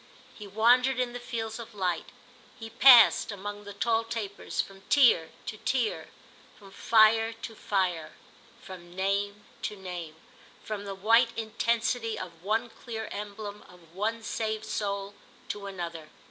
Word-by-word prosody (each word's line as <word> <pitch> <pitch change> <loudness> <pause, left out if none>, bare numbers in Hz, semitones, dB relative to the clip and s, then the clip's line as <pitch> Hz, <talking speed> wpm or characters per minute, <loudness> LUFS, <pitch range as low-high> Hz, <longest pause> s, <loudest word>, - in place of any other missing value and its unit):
He 210 - -10
wandered 245 +5 +4
in 245 -1 -1
the 245 - -5
fields 225 -2 -5
of 230 -2 -10
light; 180 -4 -2 0.5
he 225 -1 -8
passed, 240 -1 +7
among 205 +1 -7
the 205 - -8
tall 225 +2 +1
tapers, 225 -3 -5
from 195 -1 -2
tier 240 - +5 0.2
to 215 - -5
tier, 245 0 -1 0.5
from 195 -2 -15
fire 225 +2 +4
to 225 0 -8
fire, 185 -7 -1 0.5
from 175 -2 -11
name 200 +2 -1 0.2
to 210 - -3
name, 175 -5 -7 0.5
from 210 -2 -5
the 195 -1 -5
white 230 +4 +3
intensity 230 0 -1
of 170 -3 -8
one 225 +5 -1
clear 220 -2 -7
emblem, 205 0 -6
of 170 -2 -18
one 220 +4 -2
saved 220 0 -3
soul, 200 -1 -3 0.4
to 200 -1 -5
another. 170 -5 -6
210 Hz, 145 wpm, -28 LUFS, 195-230 Hz, 0.5 s, passed